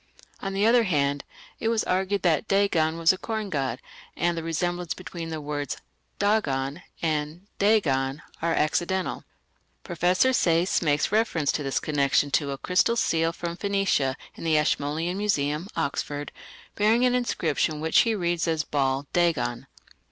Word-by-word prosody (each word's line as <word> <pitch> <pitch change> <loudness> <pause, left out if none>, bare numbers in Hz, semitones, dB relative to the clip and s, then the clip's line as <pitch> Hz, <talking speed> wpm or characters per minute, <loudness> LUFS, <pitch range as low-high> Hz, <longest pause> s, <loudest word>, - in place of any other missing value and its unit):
On 195 0 -4
the 200 +2 +2
other 235 0 +5
hand, 145 -5 0 0.4
it - - -1
was 225 -1 +1
argued 190 +1 0
that 165 -5 +2
Dagon 170 -5 +2
was 165 +2 +4
a 185 - -8
corn 220 -3 -4
god, 135 -4 -1 0.4
and 175 0 +1
that 165 - -3
the - - -10
resemblance 175 +1 -2
between 170 -2 -7
the 160 -1 -4
words 145 -2 -4 0.4
Dagan 155 -8 0 0.2
and 155 +3 -2
Dagon 150 -10 +2 0.2
are 165 +1 +1
accidental. 175 +5 0 0.6
Professor 180 +8 +2
Sayce 170 -4 +2
makes 150 -1 +1
reference 210 -9 +1
in - - -4
this 135 - 0
connection 145 -1 +1
to 140 +1 +1
a 140 - -3
crystal 180 +9 +2
seal 165 -7 +1
from 170 0 -5
Phoenicia 195 -9 0 0.2
in - - -11
the 160 -2 +3
Ashmolean 150 +4 0
Museum, 150 -5 0
Oxford, 145 +1 -3 0.4
bearing 220 +4 +3
an 250 - +3
inscription 160 -10 0
which 160 +1 +3
he 230 -2 +3
reads 175 -3 -1
as 160 -2 +1
Baal 135 -2 0
dagon. 155 -7 0
165 Hz, 155 wpm, -26 LUFS, 145-195 Hz, 0.6 s, other